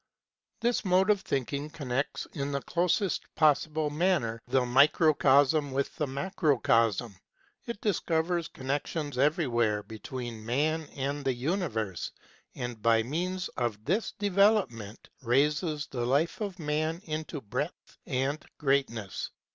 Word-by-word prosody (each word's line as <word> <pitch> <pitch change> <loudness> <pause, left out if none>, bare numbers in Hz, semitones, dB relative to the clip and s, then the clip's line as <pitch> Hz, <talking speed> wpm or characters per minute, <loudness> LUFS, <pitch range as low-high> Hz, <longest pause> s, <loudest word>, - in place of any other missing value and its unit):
This 240 -1 +1
mode 190 +1 +4
of 205 -2 +1
thinking 140 0 -2
connects, 140 -3 -3
in 140 0 -3
the 140 - -1
closest 180 +2 +1
possible 155 0 +2
manner, 150 -9 +1
the 130 0 +2
microcosm 145 +1 +4
with 135 +1 -2
the 150 - 0
macrocosm; 130 - +1 0.5
it 235 -3 -4
discovers 170 -4 0
connections 145 +1 -3
everywhere 120 - +2
between 115 +1 -7
man 155 +7 0
and 140 +1 -2
the 135 -2 0
universe, 120 - -2 0.4
and 120 -3 -5
by 115 0 +4
means 175 +8 -2
of 110 -4 -3
this 195 - 0
development 200 - +1
raises 150 +5 +1
the 120 -3 -4
life 140 - +1
of 200 -3 -3
man 155 +1 -1
into 155 -1 -4
breadth 105 -6 -5
and 135 +4 -1
great 140 -2 +2
ness. 110 -5 -5
145 Hz, 125 wpm, -29 LUFS, 125-165 Hz, 0.5 s, mode